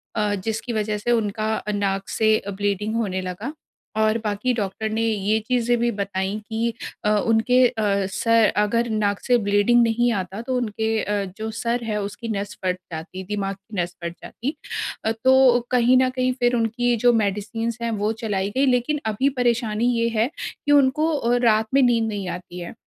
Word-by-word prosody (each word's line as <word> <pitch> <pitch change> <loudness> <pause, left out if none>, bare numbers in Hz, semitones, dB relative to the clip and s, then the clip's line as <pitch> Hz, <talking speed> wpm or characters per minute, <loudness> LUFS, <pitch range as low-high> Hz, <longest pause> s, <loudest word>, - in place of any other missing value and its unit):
अ, 210 -1 +1
जिसकी 225 +4 -3
वजह 215 -1 -1
से 225 +4 -1
उनका 220 -1 0
नाक 195 -1 -1
से 220 -1 +2 0.2
ब्लीडिंग 205 +2 -1
होने 190 -5 -1
लगा। 195 - -5 0.5
और 215 +1 +3
बाकी 210 +4 0
डॉक्टर 215 +2 -2
ने 220 +1 -1
ये 215 -1 +1
चीज़ें 240 -1 +2
भी 240 0 +2
बताई 195 +1 -2
कि 225 +1 -1 0.3
अ, - - +3 0.2
उनके 250 +3 +4
अ, 205 -4 0
सर 230 +3 +3
अगर 230 +3 +1
नाक 205 -2 0
से 245 -1 +4
ब्लीडिंग 205 +3 +3
नहीं 235 +1 +2
आता 190 +4 -5
तो 255 +2 -3
उनके 220 -2 -2
अ, 205 -1 -1
जो 220 +1 -4
सर 235 +2 -2
है 215 -2 -2
उसकी 205 +3 -6
नस 205 -1 -3
फट 180 0 +1
जाती, 175 +4 -6
दिमाग 195 0 -3
की 200 +1 -12
नस 175 0 -5
फट 170 0 -3
जाती। 280 +6 -5 0.5
अ, 220 - +2
तो 255 +2 +5
कहीं 250 +1 +4
न 255 0 +3
कहीं 255 0 0
फ़िर 245 0 +2
उनकी 240 +1 +1
जो 245 -1 +6
मेडिसिन्स 220 +2 -1
हैं 230 0 -1
वो 210 - +1
चलाई 200 -2 -1
गई 275 +1 +3
लेक़िन 255 +4 +1
अभी 220 +6 +1
परेशानी 235 -2 +1
ये 230 - +2
है 225 +5 +2 0.2
कि 290 - -4
उनको 290 +2 +4
अ, 240 -3 +1
रात 220 -1 +3
में 275 - +5
नींद 230 -3 +3
नहीं 200 -3 -4
आती 180 0 -7
है। 175 - -7
220 Hz, 185 wpm, -23 LUFS, 205-240 Hz, 0.5 s, जो